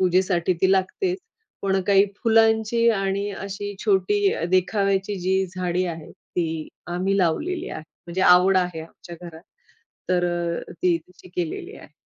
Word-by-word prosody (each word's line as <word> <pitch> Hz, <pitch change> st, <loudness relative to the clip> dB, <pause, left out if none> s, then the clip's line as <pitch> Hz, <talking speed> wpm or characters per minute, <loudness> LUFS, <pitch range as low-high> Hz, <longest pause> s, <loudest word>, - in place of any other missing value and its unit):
पूजेसाठी 185 Hz, -1 st, +2 dB
ती 190 Hz, -, +5 dB
लागतेच. 360 Hz, -, 0 dB, 0.4 s
पण 195 Hz, -1 st, +1 dB
काही 195 Hz, -1 st, +5 dB, 0.2 s
फुलांची 225 Hz, 0 st, +3 dB
आणि 195 Hz, +1 st, -1 dB
अशी 200 Hz, +1 st, -6 dB
छोटी 200 Hz, 0 st, +2 dB
अ, -, -, -3 dB
देखाव्याची 195 Hz, +1 st, +1 dB
जी 190 Hz, +1 st, +1 dB
झाडी 180 Hz, 0 st, 0 dB
आहेत 165 Hz, -3 st, -7 dB, 0.2 s
ती 160 Hz, -3 st, -2 dB, 0.2 s
आम्ही 185 Hz, +3 st, 0 dB
लावलेली 305 Hz, -, 0 dB
आहे. 155 Hz, -, -6 dB, 0.2 s
म्हणजे 175 Hz, +2 st, -3 dB
आवड 180 Hz, +2 st, +6 dB
आहे 180 Hz, -3 st, -2 dB
आमच्या 170 Hz, +1 st, -11 dB
घरात 170 Hz, -2 st, -10 dB, 0.7 s
तर 180 Hz, -1 st, +2 dB
अ, 175 Hz, -1 st, -3 dB
ती 175 Hz, 0 st, +1 dB
तशी 180 Hz, +2 st, -18 dB
केलेली 170 Hz, -3 st, -4 dB
आहे. -, -, -15 dB
185 Hz, 145 wpm, -23 LUFS, 175-200 Hz, 0.7 s, आवड